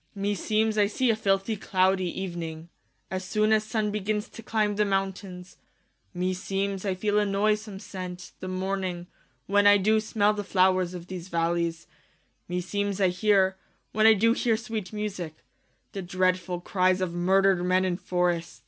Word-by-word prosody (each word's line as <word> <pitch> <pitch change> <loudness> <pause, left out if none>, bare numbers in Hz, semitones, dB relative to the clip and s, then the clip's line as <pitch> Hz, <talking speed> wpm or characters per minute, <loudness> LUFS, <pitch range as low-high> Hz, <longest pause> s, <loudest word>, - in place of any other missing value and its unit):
Klaius. 200 - -7
Me 205 +1 +1
seemes 215 +2 0
I 205 - +4
see 240 +3 +1
a - - +1
filthie 195 0 0
clow 190 0 +3
die 185 - -4
evening, 170 -3 -5 0.4
As 185 0 -3
soon 215 +3 +2
as 215 -1 +3
Sunne 215 -1 -1
begins 210 +1 -2
to - - -10
clime 215 -2 0
the 210 - +2
mountaines: 195 -2 -3 0.5
Me 185 0 -1
seemes 195 +1 -3
I 190 -2 0
feele 205 +2 +1
a - - +3
noysome 210 0 0
sent, 180 -2 -7
the 185 - -6
morning 185 -1 -3 0.4
When 205 +1 +4
I 205 0 +8
doo 215 +3 +3
smell 215 -1 +1
the 205 -1 -4
flowers 185 -2 +2
of 175 -1 -7
these 180 -1 -7
v 170 - -5
allies: 170 0 0 0.6
Me 180 0 -1
seemes 200 +2 -2
I 190 -2 +4
heare, 190 0 +2 0.3
when 215 +1 +4
I 220 - +8
doo 230 +3 +3
heare 235 -2 +1
sweet 220 -4 -5
e - - -9
musique, 185 -7 -5 0.5
The 195 - -5
dreadfull 185 -1 0
cries 185 0 +2
of 185 -2 -1
murdred 190 +1 +3
men 185 +1 +2
in 180 -2 -1
forrests. 180 -2 -1
195 Hz, 185 wpm, -27 LUFS, 180-210 Hz, 0.6 s, I